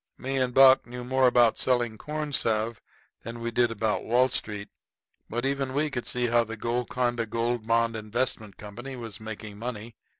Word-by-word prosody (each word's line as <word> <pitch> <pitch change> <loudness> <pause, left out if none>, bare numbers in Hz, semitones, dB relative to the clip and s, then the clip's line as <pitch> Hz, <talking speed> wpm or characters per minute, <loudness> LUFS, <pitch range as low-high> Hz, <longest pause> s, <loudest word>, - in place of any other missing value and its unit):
Me 135 +1 -3
and 125 -2 0
Buck 135 -1 +7
knew 125 +1 -7
more 130 +1 +3
about 120 -2 +4
selling 120 -3 +1
corn 150 +4 -5
salve 110 -2 0 0.4
than 115 +1 -7
we 115 0 -3
did 120 +1 +3
about 110 -1 -1
Wall 125 +3 +3
Street, 105 -4 -2 0.6
but 120 +3 -2
even 135 -1 -1
we 150 +1 +1
could 120 -3 -4
see 125 0 0
how 120 0 +3
the 115 0 -7
Golconda 120 0 -1
Gold 115 0 -2
Bond 115 0 +2
Investment 110 -1 -3
Company 120 +6 -8
was 115 -4 -7
making 110 -1 -8
money. 115 -1 -6
120 Hz, 175 wpm, -27 LUFS, 110-125 Hz, 0.6 s, Buck